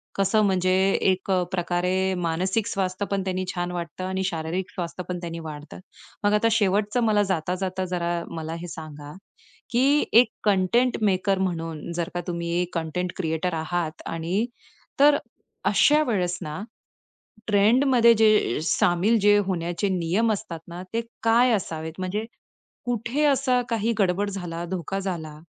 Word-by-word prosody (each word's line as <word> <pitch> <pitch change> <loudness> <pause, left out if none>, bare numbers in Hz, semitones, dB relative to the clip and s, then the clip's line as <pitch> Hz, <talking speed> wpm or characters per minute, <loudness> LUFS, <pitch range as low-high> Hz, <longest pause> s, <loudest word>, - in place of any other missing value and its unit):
कसं 195 +2 +2
म्हणजे 185 -1 +2 0.3
एक 190 0 +1
अ, 185 -1 +3
प्रकारे 180 +1 0
मानसिक 185 +6 0
स्वास्थ्य 190 -2 -2
पण 195 -1 0
त्यांनी 185 0 -2
छान 175 0 -2
वाटतं 170 0 -5
आणि 190 0 -2
शारीरिक 175 +1 -3
स्वास्थ्य 180 0 -5
पण 180 -1 -3
त्यांनी 170 -1 -6
वाढतं. 150 -2 -8 0.4
मग 205 0 +3
आता 210 +2 +3
शेवटचं 210 +2 +2
मला 210 -2 +3
जाता-जाता 185 +1 -2
जरा 175 -1 -2
मला 160 -1 -5
हे 175 - -6
सांगा? 150 -3 -9 0.6
की 275 +5 +3
एक 240 +2 +7 0.2
कंटेंट 210 +5 +2
मेकर 195 -1 +2
म्हणून 165 -4 -3
जर 170 -1 -2
का 175 - -2
तुम्ही 170 -1 -3
एक 180 - -4
कंटेंट 170 +2 -2
क्रिएटर 165 0 -1
आहात 160 0 -3
आणि 170 +7 -1 0.5
तर 290 0 +6 0.5
अशा 300 +1 +4
वेळेस 180 -5 0
ना 150 +3 -5 0.9
ट्रेंडमध्ये 235 +4 +5
जे 215 - +3
सामील 180 +6 +2
जे 205 0 +6
होण्याचे 175 +1 -1
नियम 185 +5 +1
असतात 180 -5 -6
ना, 175 +1 -7
ते 230 - +1 0.2
काय 235 +2 +4
असावेत? 160 -6 -3
म्हणजे 195 +4 -2 0.6
कुठे 245 +5 -1
असा 265 -3 +3
काही 230 0 0
गडबड 195 +1 +1
झाला, 175 -3 -5
धोका 185 +2 -3
झाला 160 -6 -5
185 Hz, 145 wpm, -25 LUFS, 170-210 Hz, 0.9 s, एक